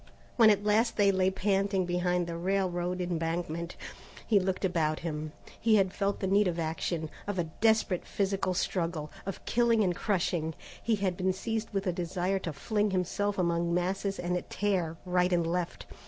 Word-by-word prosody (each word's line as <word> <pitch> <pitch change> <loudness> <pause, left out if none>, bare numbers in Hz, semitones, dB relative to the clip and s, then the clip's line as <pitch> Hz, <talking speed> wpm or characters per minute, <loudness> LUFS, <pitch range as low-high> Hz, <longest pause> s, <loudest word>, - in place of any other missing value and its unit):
When 225 -3 +7
at 205 -1 +3
last 220 +3 +2
they 200 -2 +5
lay 190 -1 +2
panting 195 0 +1
behind 180 0 0
the 170 0 -5
railroad 180 0 -1
embankment, 170 -1 -2 0.5
he 210 -3 +4
looked 190 +1 -1
about 160 -4 0
him. 155 -2 -4 0.3
He 225 -1 +4
had 190 -2 +3
felt 200 0 -1
the - - 0
need 200 +1 +3
of 175 -1 -1
action, 160 0 -2 0.2
of 205 -2 -2
a 175 - +2
desperate 205 +2 +1
physical 195 -2 0
struggle, 165 -5 -1 0.2
of 195 - -5
killing 235 -2 +3
and 180 -3 +1
crushing. 170 -6 -1 0.3
He 230 - +2
had 195 -3 -1
been 185 0 +1
seized 220 +3 -3
with 195 -1 -2
a 180 - +1
desire 180 +2 -1
to 170 - -4
fling 210 +8 0
himself 195 +2 -1
among 170 -1 +1
masses 195 +2 -1
and 180 0 -1
tear 180 -6 0
right 180 0 +2
and 170 -2 +2
left. 175 +1 -2
185 Hz, 175 wpm, -30 LUFS, 170-200 Hz, 0.5 s, When